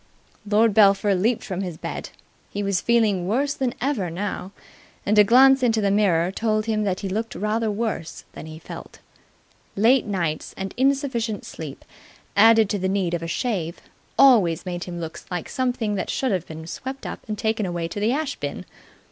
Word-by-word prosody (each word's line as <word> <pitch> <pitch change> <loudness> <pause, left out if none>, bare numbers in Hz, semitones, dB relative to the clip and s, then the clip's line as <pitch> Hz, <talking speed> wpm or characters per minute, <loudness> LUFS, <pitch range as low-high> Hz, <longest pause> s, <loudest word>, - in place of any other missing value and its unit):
Lord 215 +1 +4
Belpher 200 0 +5
leaped 215 +6 +1
from 190 -1 -4
his 180 -4 -5
bed. - - -6 0.4
He 205 - -3
was 195 -2 0
feeling 215 -6 +2
worse 275 +7 +1
than 260 -4 -2
ever 240 -9 -1
now, 190 +2 -4 0.5
and 210 +1 +3
a - - +9
glance 265 +5 +6
into 230 -3 +2
the 200 -2 +1
mirror 185 -4 +2
told 215 +1 0
him 215 -2 0
that 190 -2 -1
he 200 - -3
looked 220 +4 -3
rather 215 +2 0
worse 210 -6 -3
than - - -9
he 155 0 -9
felt. 160 - -10 0.8
Late 230 +4 +4
nights 170 -6 -2
and 195 0 -4
insufficient 260 -5 0
sleep, 150 -4 -8 0.5
added 225 +1 +6
to 205 - -1
the 190 +1 0
need 190 -3 0
of 170 - -1
a 165 - -4
shave, 175 -4 -2 0.4
always 205 - +5
made 175 -1 -4
him 175 -1 -6
look 165 -1 -6
like 180 -2 -4
something 245 -4 -1
that 195 - -3
should 260 -3 0
have 180 -3 -1
been 160 0 -8
swept 265 +10 -7
up - - -5
and 215 -1 -3
taken 220 -1 0
away 170 -1 -3
to 205 - -5
the 215 +3 +2
ash 290 +1 -1
bin. - - -5
205 Hz, 190 wpm, -23 LUFS, 180-230 Hz, 0.8 s, a